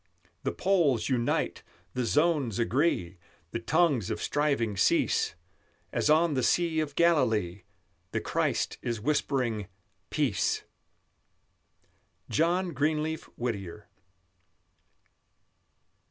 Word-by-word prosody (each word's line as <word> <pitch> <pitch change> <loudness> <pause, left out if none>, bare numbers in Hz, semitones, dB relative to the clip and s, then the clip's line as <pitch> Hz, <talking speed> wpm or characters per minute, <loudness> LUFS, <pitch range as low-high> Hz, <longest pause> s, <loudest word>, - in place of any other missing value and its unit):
The - - -1
poles 165 - +2
unite, 120 -3 0 0.3
the 125 -1 -1
zones 145 - +2
agree, 115 - 0 0.3
The 115 - -2
tongues 145 - +2
of 110 -1 -2
striving 140 -8 0
cease; 85 -1 +2 0.6
As - - +1
on 160 +1 +4
the 130 - +1
Sea 165 +5 +2
of 150 -2 -2
Galilee 115 - +2 0.5
The - - -1
Christ - - -1
is 120 -2 -2
whispering, 125 -5 0 0.4
Peace! 140 -9 0 1.7
JOHN 175 +3 +2
GREENLEAF 155 +2 -1
WHITTIER. 105 -5 -4
135 Hz, 95 wpm, -29 LUFS, 115-155 Hz, 1.7 s, on